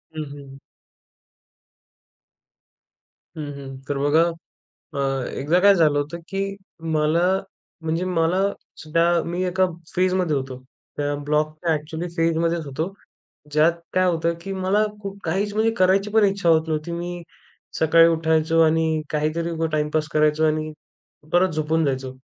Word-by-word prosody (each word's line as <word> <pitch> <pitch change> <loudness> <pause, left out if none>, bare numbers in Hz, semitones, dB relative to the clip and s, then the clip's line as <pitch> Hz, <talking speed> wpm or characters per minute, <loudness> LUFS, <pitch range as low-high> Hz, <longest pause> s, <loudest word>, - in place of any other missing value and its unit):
हं, 155 - -3
हं, 145 - -9
हं. 135 -1 -12 2.8
हं, 155 -2 -5
हं. 135 -1 -8
तर 145 - -2
बघा, 145 +3 +3 0.7
अ, 135 -2 -1
एकदा 160 +6 +1
काय 200 +1 +7
झालं 150 -4 +3
होतं, 150 +4 -4
की 195 0 -3 0.4
मला 160 +4 +2 0.5
म्हणजे 165 +2 -1
मला 180 +1 +1 0.4
सुद्धा 165 +2 +2
मी 175 +2 -2
एका 185 +1 +2 0.3
फेजमध्ये 180 -3 +1
होतो. 130 -1 -4 0.4
त्या 145 0 -1
ब्लॉकच्या 155 +2 0
एक्चुअली 160 +3 -5
फेजमध्येच 165 0 +1
होतो, 160 +8 -4 0.6
ज्यात 155 +3 +4 0.2
काय 185 0 +3
होतं, 170 -1 +1
की 195 +2 -5
मला 190 +3 +1 0.2
खूप 200 0 -6
काहीच 195 +5 -1
म्हणजे 220 +2 +2
करायची 190 +2 +3
पण 220 -1 +4
इच्छा 195 -3 +1
होत 160 0 +4
नव्हती. 155 +2 -2
मी 175 0 -5 0.6
सकाळी 165 +1 +6
उठायचो 160 0 +2
आणि 160 0 +2
काहीतरी 155 +3 -1
उगाच 165 -1 -1
टाइमपास 155 0 0
करायचो 155 +1 +3
आणि 155 0 0 0.6
परत 185 +1 +4
झोपून 155 +1 +1
जायचो. 130 -1 -2
160 Hz, 135 wpm, -23 LUFS, 150-180 Hz, 2.8 s, काय